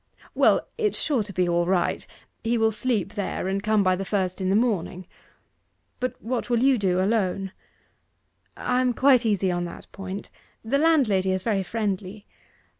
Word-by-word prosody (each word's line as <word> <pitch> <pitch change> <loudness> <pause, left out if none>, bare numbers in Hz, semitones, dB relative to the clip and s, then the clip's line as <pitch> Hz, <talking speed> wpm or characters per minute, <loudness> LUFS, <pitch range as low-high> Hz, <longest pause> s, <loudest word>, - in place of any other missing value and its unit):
'Well, - - +3
it's 425 -2 0
sure 280 -7 +1
to 205 -1 -5
be 180 -1 0
all 175 0 +1
right 185 -1 0 0.4
he 235 +1 +1
will 225 0 +3
sleep 210 -3 -1
there, 200 -2 -3
and 195 +1 -1
come 215 -1 +2
by 185 -1 +3
the 190 - -4
first 190 -1 -2
in 185 - 0
the 195 - +3
morning. 195 -5 0 0.9
But 255 -1 -3
what 245 +1 -3
will 240 - +2
you 265 -3 +4
do, 185 -2 +1
alone?' 195 -1 0 1.1
'I 250 0 0
am 250 -1 +1
quite 255 -3 +4
easy 195 -3 +1
on 175 0 -1
that 170 - -9
point; 195 0 -7 0.3
the 275 +5 +1
landlady 245 - +3
is 185 0 -1
very 210 -4 +1
friendly. 200 0 -3
205 Hz, 175 wpm, -25 LUFS, 185-235 Hz, 1.1 s, you